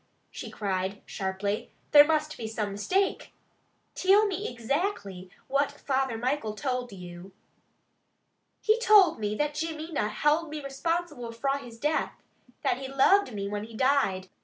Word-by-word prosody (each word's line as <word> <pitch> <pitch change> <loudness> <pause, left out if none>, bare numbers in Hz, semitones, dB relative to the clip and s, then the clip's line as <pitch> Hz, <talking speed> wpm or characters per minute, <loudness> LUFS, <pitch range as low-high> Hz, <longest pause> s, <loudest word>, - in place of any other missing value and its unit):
she - - -7
cried 195 -1 -2
sharply. 195 +2 -3 0.2
"There 290 -1 +10
must 305 0 0
be 225 - -5
some 215 -2 -3
mistake. 375 - -1 0.6
Till 400 +3 +4
me 395 -3 -2
ixactly 235 - -3 0.2
what 275 +1 +2
Father 265 -4 -1
Michael 245 -2 -1
told 250 -1 -2
you?" 180 0 -10 1.3
"He 435 +1 +3
told 410 - +6
me 210 0 -1
that 295 +4 0
Jimmy 320 +1 -4
na 245 -9 0
held 300 +8 +1
me 305 0 -5
responsible 295 -3 -3
fra 275 +4 -1
his 240 -4 -11
death. 300 +5 0 0.5
That - - +1
he 270 - -5
loved 275 +6 +4
me 200 -1 -3
when 205 +1 -3
he 225 0 -12
died. 235 -9 +2
270 Hz, 145 wpm, -28 LUFS, 210-310 Hz, 1.3 s, There